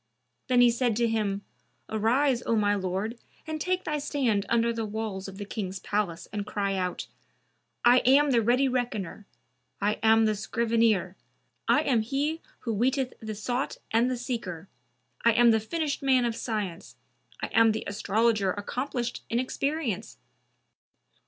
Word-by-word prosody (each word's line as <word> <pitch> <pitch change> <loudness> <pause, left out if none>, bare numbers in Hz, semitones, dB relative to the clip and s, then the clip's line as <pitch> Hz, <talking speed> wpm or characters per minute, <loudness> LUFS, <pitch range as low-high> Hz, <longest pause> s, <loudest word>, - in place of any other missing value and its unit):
Then 250 -1 +4
he 240 -1 +7
said 235 -1 0
to 235 +1 +2
him, 205 -3 -1 0.4
"Arise, 240 +4 +2
O 230 - +2
my 205 -1 +3
lord, 200 +4 -2 0.3
and 315 -1 -4
take 365 +2 0
thy 300 -1 -2
stand 255 -8 0
under 235 0 +2
the 230 -1 -3
walls 210 -2 -4
of 195 0 -9
the 205 - -5
King's 195 -2 -4
palace 185 -4 -2
and 205 -1 -2
cry 200 -1 -2
out, 180 -1 -2 0.8
'I 245 +1 +7
am 275 +3 +4
the 235 -2 +4
ready 245 +5 +3
Reckoner; 235 -6 -3 0.5
I 205 +1 0
am 225 0 +5
the 215 - +2
Scrivener; 220 -3 +1 0.5
I - - +4
am 240 -5 +2
he 285 +8 -1 0.2
who 230 - -2
weeteth 255 +4 0
the 220 -2 -6
Sought 245 +5 -2
and 230 +3 +3
the 255 - -1
Seeker; 200 -9 -5 0.6
I 235 - +5
am 240 +1 +6
the 220 - +3
finished 300 +7 -2
man 260 -3 +3
of 235 -1 -1
Science; 210 -8 -4 0.4
I - - -3
am 225 0 +6
the 215 - -3
Astrologer 205 -1 +1
accomplished 245 +3 -3
in 230 - 0
experience! 255 - -2
230 Hz, 160 wpm, -27 LUFS, 205-250 Hz, 0.8 s, he